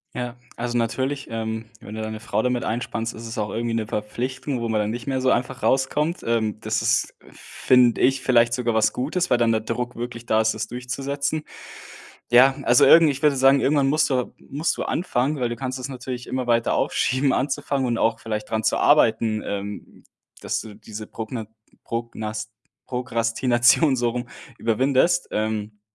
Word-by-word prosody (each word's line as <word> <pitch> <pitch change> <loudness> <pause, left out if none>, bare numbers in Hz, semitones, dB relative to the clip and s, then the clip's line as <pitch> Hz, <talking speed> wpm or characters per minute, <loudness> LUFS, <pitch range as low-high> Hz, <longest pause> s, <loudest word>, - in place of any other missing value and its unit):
Ja, 125 0 -4 0.2
also, 120 0 -2
natürlich, 130 +4 -1
ähm, 110 0 -4 0.2
wenn 105 - -9
du 110 - -5
deine 110 0 -5
Frau 110 -1 -1
damit 125 0 0
einspannst, 115 0 -3
ist 115 +1 -8
es 115 +2 -7
auch 105 -1 -1
irgendwie 115 +2 -2
'ne 110 -1 -1
Verpflichtung, 125 +5 -3
wo 115 - -2
man 110 -1 +1
dann 105 - 0
nicht 120 +3 -5
mehr 130 -1 0
so 130 0 +2
einfach 125 +2 0
rauskommt. 150 +6 +1
Ähm, 110 -2 0
das - - -1
ist, - - +1 0.2
finde 125 -2 +2
ich, 135 +1 +3
vielleicht 120 -2 +3
sogar 120 -1 0
was 110 -1 +2
Gutes, 170 +8 -1
weil 125 - +4
dann 115 -1 +2
der 110 - +2
Druck 120 +2 -4
wirklich 120 -1 -6
da 110 -1 +2
ist, 110 0 +2
das - - -4
durchzusetzen. 140 +5 -3 0.9
Ja, 130 +3 +7
also, 120 - +5
irgend 165 -1 +8
ich 140 +1 -5
würde 145 -2 +4
sagen, 135 +1 +5
irgendwann 140 -1 +2
musst 155 +1 +2
du 125 -2 -1
musst 150 +4 -2
du - - -3
anfangen, 145 -4 -1
weil 120 - +1
du 120 - -4
kannst 130 +1 -4
es 130 - -5
natürlich 125 -2 -6
immer 130 -1 -3
weiter 115 -1 +2
aufschieben 130 +1 +1
anzufangen 135 0 -1
und 120 -1 0
auch 115 0 +1
vielleicht 105 -1 -4
dran 110 -1 0
zu - - +1
arbeiten, 110 -6 +3
ähm, 100 0 -6 0.4
dass - - -1
du 105 -2 -10
diese 110 0 -9
Progna 110 0 -6 0.4
Prognas 110 -2 -4 0.3
Prokrastination- 125 +3 +2
so 120 -1 +1
rum- 120 0 -5 0.3
überwindest. 130 +7 +2
Ähm, 105 -1 -3
120 Hz, 185 wpm, -23 LUFS, 110-130 Hz, 0.9 s, irgend